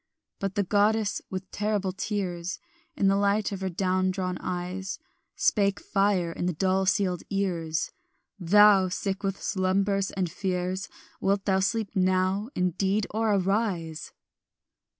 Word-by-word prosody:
But 195 Hz, -1 st, -3 dB
the 205 Hz, -, +2 dB
goddess, 210 Hz, +2 st, +2 dB
with 185 Hz, 0 st, -6 dB
terrible 205 Hz, -2 st, -1 dB
tears 185 Hz, -3 st, -3 dB, 0.4 s
In 200 Hz, -, +1 dB
the 195 Hz, -, +4 dB
light 200 Hz, +1 st, +1 dB
of 195 Hz, -1 st, -5 dB
her 190 Hz, -, -1 dB
down 185 Hz, +1 st, +1 dB
drawn 185 Hz, -1 st, -2 dB
eyes, 180 Hz, +2 st, -4 dB, 0.4 s
Spake 200 Hz, -2 st, +2 dB
fire 195 Hz, -4 st, +1 dB
in 175 Hz, -, -3 dB
the 180 Hz, -, 0 dB
dull 190 Hz, +3 st, +1 dB
sealed 185 Hz, -3 st, +1 dB
ears; 170 Hz, -5 st, -1 dB, 0.5 s
"Thou, 195 Hz, +1 st, +6 dB
sick 195 Hz, +2 st, -2 dB
with 195 Hz, -1 st, -2 dB
slumbers 195 Hz, +1 st, 0 dB
and 190 Hz, -2 st, -1 dB
fears, 185 Hz, +1 st, -2 dB, 0.3 s
Wilt 195 Hz, 0 st, +1 dB
thou 190 Hz, -1 st, +3 dB
sleep 215 Hz, +2 st, -1 dB
now 185 Hz, +3 st, +1 dB
indeed 190 Hz, +3 st, +1 dB
or 220 Hz, -1 st, +1 dB
arise? 185 Hz, -5 st, -1 dB
190 Hz, 135 wpm, -27 LUFS, 185-200 Hz, 0.5 s, Thou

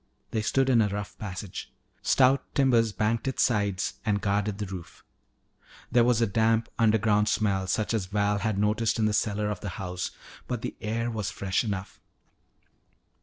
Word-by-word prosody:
They 110 Hz, -, 0 dB
stood 135 Hz, +5 st, +1 dB
in 125 Hz, -3 st, +5 dB
a 105 Hz, -, +3 dB
rough 105 Hz, +1 st, -5 dB
passage. 95 Hz, -2 st, -6 dB, 0.3 s
Stout 135 Hz, +1 st, +4 dB
timbers 120 Hz, -5 st, +3 dB
banked 110 Hz, +3 st, 0 dB
its 130 Hz, -, +1 dB
sides 100 Hz, -5 st, 0 dB
and 105 Hz, -2 st, +1 dB
guarded 100 Hz, 0 st, 0 dB
the 105 Hz, -, -3 dB
roof. 95 Hz, -3 st, -9 dB, 0.9 s
There 120 Hz, -1 st, +5 dB
was 120 Hz, -1 st, +3 dB
a -, -, +5 dB
damp 115 Hz, +2 st, +2 dB
underground 110 Hz, -1 st, +3 dB
smell 95 Hz, -3 st, +1 dB
such 105 Hz, +4 st, 0 dB
as 105 Hz, -5 st, -1 dB
Val 100 Hz, +1 st, +1 dB
had 110 Hz, -1 st, -1 dB
noted 105 Hz, +3 st, +1 dB
in 110 Hz, -, +2 dB
the 105 Hz, -, +1 dB
cellar 105 Hz, -1 st, 0 dB
of 105 Hz, -, -4 dB
the 100 Hz, -, -5 dB
house, 90 Hz, -1 st, -3 dB, 0.4 s
but 125 Hz, -3 st, -3 dB
the -, -, -4 dB
air 115 Hz, +2 st, -1 dB
was 105 Hz, -4 st, -2 dB
fresh 95 Hz, +2 st, -1 dB
enough. 100 Hz, -3 st, -4 dB
105 Hz, 170 wpm, -27 LUFS, 100-115 Hz, 0.9 s, in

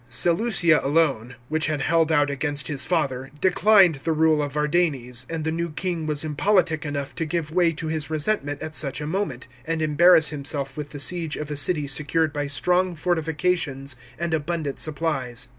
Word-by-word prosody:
Seleucia 170 Hz, -, +3 dB
alone, 135 Hz, -5 st, +1 dB
which 155 Hz, +2 st, 0 dB
had; 150 Hz, -3 st, -1 dB
held 165 Hz, 0 st, +2 dB
out 145 Hz, -2 st, +2 dB
against 145 Hz, +1 st, -2 dB
his 140 Hz, -3 st, -1 dB
father, 135 Hz, -7 st, -1 dB
declined 190 Hz, -2 st, +4 dB
the 165 Hz, -, 0 dB
rule 155 Hz, -1 st, +3 dB
of 145 Hz, -2 st, -4 dB
Vardanes, 145 Hz, -5 st, 0 dB
and 165 Hz, -1 st, -3 dB
the 160 Hz, -, -1 dB
new 170 Hz, +1 st, -2 dB
king 165 Hz, 0 st, -3 dB
was 150 Hz, -1 st, -1 dB
impolitic 165 Hz, +1 st, +1 dB
enough 140 Hz, -1 st, -4 dB
to -, -, -3 dB
give 155 Hz, -1 st, -3 dB
way 175 Hz, 0 st, +3 dB
to 160 Hz, -, -6 dB
his 155 Hz, -1 st, -2 dB
resentment 150 Hz, -2 st, -1 dB
at 155 Hz, 0 st, -6 dB
such 140 Hz, -3 st, -1 dB
a 150 Hz, -, -4 dB
moment, 170 Hz, -6 st, -3 dB, 0.2 s
and 165 Hz, +3 st, -2 dB
embarrass 160 Hz, +1 st, +5 dB
himself 140 Hz, -2 st, -4 dB
with 150 Hz, -1 st, -6 dB
the 145 Hz, -, -8 dB
siege 165 Hz, +1 st, -1 dB
of 150 Hz, 0 st, -6 dB
a -, -, -2 dB
city 145 Hz, +2 st, +2 dB
secured 150 Hz, +2 st, +1 dB
by 145 Hz, -1 st, -2 dB
strong 180 Hz, +5 st, +1 dB
fortifications 160 Hz, -4 st, -1 dB, 0.2 s
and 170 Hz, 0 st, -2 dB
abundant 160 Hz, -2 st, -2 dB
supplies. 135 Hz, -6 st, -2 dB
155 Hz, 180 wpm, -24 LUFS, 145-165 Hz, 0.2 s, embarrass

